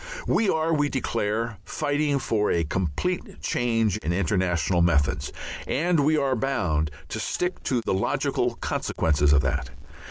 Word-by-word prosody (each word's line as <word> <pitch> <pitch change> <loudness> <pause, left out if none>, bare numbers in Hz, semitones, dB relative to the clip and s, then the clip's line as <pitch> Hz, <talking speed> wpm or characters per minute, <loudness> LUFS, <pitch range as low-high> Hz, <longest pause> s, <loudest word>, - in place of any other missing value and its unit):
We 220 - +2
are, 160 0 +1
we 145 -2 +2
declare, 115 -3 -2
fighting 145 0 0
for 110 -5 0
a 85 - +2
complete 90 - -2
change 115 -4 +1
in 85 -6 -3
international 90 -1 +1
methods, 80 -4 +2 0.4
and 170 +3 +1
we 155 +2 +3
are 135 -3 +1
bound 90 - 0 0.2
to - - -4
stick 180 +1 -2
to 125 -3 +1
the - - -1
logical 95 - 0
consequences 75 -2 +1
of 75 -1 +5
that. 65 - -1
110 Hz, 145 wpm, -25 LUFS, 85-145 Hz, 0.4 s, of